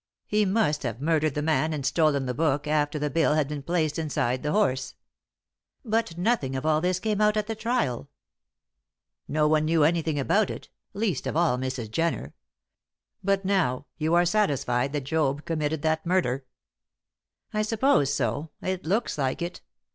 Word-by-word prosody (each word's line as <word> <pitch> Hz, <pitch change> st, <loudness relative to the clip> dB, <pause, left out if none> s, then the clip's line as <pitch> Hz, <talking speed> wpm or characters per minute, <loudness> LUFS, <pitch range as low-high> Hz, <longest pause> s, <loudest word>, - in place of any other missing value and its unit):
He 210 Hz, 0 st, +2 dB
must 190 Hz, -7 st, +1 dB
have 120 Hz, -2 st, -4 dB
murdered 155 Hz, -1 st, +1 dB
the 150 Hz, -, -1 dB
man 160 Hz, 0 st, +1 dB
and 140 Hz, -3 st, -3 dB
stolen 150 Hz, -4 st, +2 dB
the 125 Hz, -, -2 dB
book 145 Hz, +1 st, 0 dB
after 150 Hz, 0 st, 0 dB
the 150 Hz, -1 st, -2 dB
bill 160 Hz, -2 st, +2 dB
had 155 Hz, -3 st, +1 dB
been 150 Hz, -1 st, -5 dB
placed 160 Hz, 0 st, -1 dB
inside 130 Hz, -5 st, -1 dB
the 150 Hz, -, -1 dB
horse. 170 Hz, -11 st, 0 dB, 0.9 s
"But 220 Hz, -6 st, -1 dB
nothing 175 Hz, -, 0 dB
of 130 Hz, -, -3 dB
all 155 Hz, 0 st, +3 dB
this 180 Hz, +1 st, +1 dB
came 215 Hz, 0 st, -1 dB
out 210 Hz, 0 st, +3 dB
at 210 Hz, -, 0 dB
the 225 Hz, -, -3 dB
trial." 220 Hz, -, -1 dB, 1.2 s
"No 150 Hz, +1 st, +2 dB
one 155 Hz, 0 st, +3 dB
knew 160 Hz, -1 st, +3 dB
anything 160 Hz, -1 st, +1 dB
about 200 Hz, +10 st, +2 dB
it -, -, -7 dB, 0.3 s
least 200 Hz, -, -1 dB
of 140 Hz, -, -2 dB
all 165 Hz, -7 st, +2 dB
Mrs. 130 Hz, -4 st, -4 dB
Jenner. 165 Hz, +7 st, -1 dB, 0.9 s
But 195 Hz, 0 st, +1 dB
now 160 Hz, -10 st, +1 dB
you 160 Hz, +2 st, +2 dB
are 175 Hz, 0 st, +4 dB
satisfied 140 Hz, -, +1 dB
that 145 Hz, -, -1 dB
Job 145 Hz, 0 st, 0 dB
committed 155 Hz, -2 st, -2 dB
that 160 Hz, 0 st, +1 dB
murder?" 170 Hz, -7 st, 0 dB, 1.1 s
"I 215 Hz, -, +1 dB
suppose 215 Hz, -, +2 dB
so; 140 Hz, +3 st, -1 dB
it 185 Hz, -3 st, -3 dB
looks 205 Hz, -3 st, 0 dB
like 130 Hz, -1 st, 0 dB
it. 175 Hz, -, -6 dB
155 Hz, 170 wpm, -26 LUFS, 140-185 Hz, 1.2 s, are